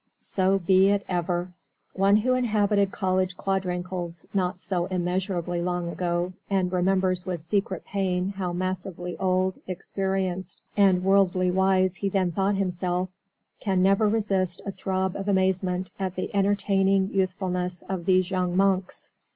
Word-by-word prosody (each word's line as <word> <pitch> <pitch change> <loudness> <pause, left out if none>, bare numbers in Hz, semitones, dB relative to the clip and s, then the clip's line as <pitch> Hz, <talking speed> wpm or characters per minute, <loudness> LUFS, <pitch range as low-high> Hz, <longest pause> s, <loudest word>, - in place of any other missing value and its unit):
So 190 0 +1
be 190 +1 +4
it 200 0 +1
ever! 175 0 -1 0.4
One 195 +1 +4
who 240 +4 +2
inhabited 210 -5 +2
college 185 -1 0
quadrangles 180 -3 -3
not 180 -2 0
so 180 -1 -1
immeasurably 180 -1 -1
long 175 -1 -1
ago, 175 +1 -1 0.2
and 190 -2 +1
remembers 185 0 +1
with 175 -4 -3
secret 190 +1 -1
pain 185 -2 -1
how 190 -3 -3
massively 180 0 -4
old, 185 0 +1
experienced, 190 -1 -3 0.2
and 190 -3 +4
worldly 185 -2 +3
wise 185 0 +2
he 200 - -1
then 185 -2 +1
thought 195 +4 +1
himself, 180 -1 -1 0.5
can 190 -2 +1
never 195 +2 +4
resist 195 -5 0
a 200 - -2
throb 190 -1 -2
of 195 0 -5
amazement 185 -1 +1
at 190 -1 -2
the 185 - -4
entertaining 195 -1 +2
youthfulness 185 -2 -1
of 185 -3 -3
these 185 0 +3
young 180 -1 0
monks. 195 -1 0
185 Hz, 140 wpm, -26 LUFS, 180-195 Hz, 0.5 s, be